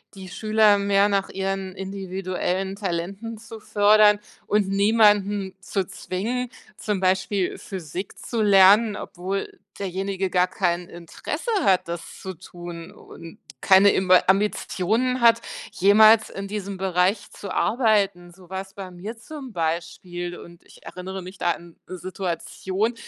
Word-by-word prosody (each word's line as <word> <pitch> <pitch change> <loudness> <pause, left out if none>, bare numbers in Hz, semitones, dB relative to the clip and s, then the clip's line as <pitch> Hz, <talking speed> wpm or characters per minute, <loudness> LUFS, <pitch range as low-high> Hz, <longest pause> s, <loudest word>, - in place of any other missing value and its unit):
die 190 -1 -9
Schüler 215 0 +3
mehr 200 0 +3
nach 195 -1 0
ihren 195 -1 -3
individuellen 190 0 -3
Talenten 195 +4 -4
zu 225 0 -11
fördern 210 0 +5 0.3
und 205 -2 +1
niemanden 205 -1 +3
zu 190 0 -2
zwingen, 220 +7 -4 0.3
zum 210 -3 -2
Beispiel 190 0 0
Physik 185 0 -7
zu 230 -2 -3
lernen, 205 +2 +6
obwohl 190 0 -5 0.2
derjenige 190 0 -3
gar 180 0 +2
kein 175 -1 -1
Interesse 235 - -5
hat, 185 - +3
das 170 0 -7
zu 190 - -6
tun, 175 0 -10
und 165 -5 -13 0.2
keine 195 +1 +6
Imba 185 -1 +4
Ambitionen 210 +5 +1
hat, 230 -1 +5 0.3
jemals 215 +3 +6
in 195 0 -6
diesem 200 -1 -5
Bereich 190 +2 0
zu 200 - -8
arbeiten. 200 -7 +1
So 180 -1 -18
war's 190 0 -6
bei 195 -2 -8
mir 190 +6 -8
zum 265 +1 -9
Beispiel, 175 +1 -4
und 170 0 -14
ich - - -19
erinnere 190 +1 -7
mich 185 +1 -10
da 175 - +2
an 170 0 -9
'ne 185 - -7
Situation, 185 +4 -3
195 Hz, 135 wpm, -24 LUFS, 180-210 Hz, 0.3 s, lernen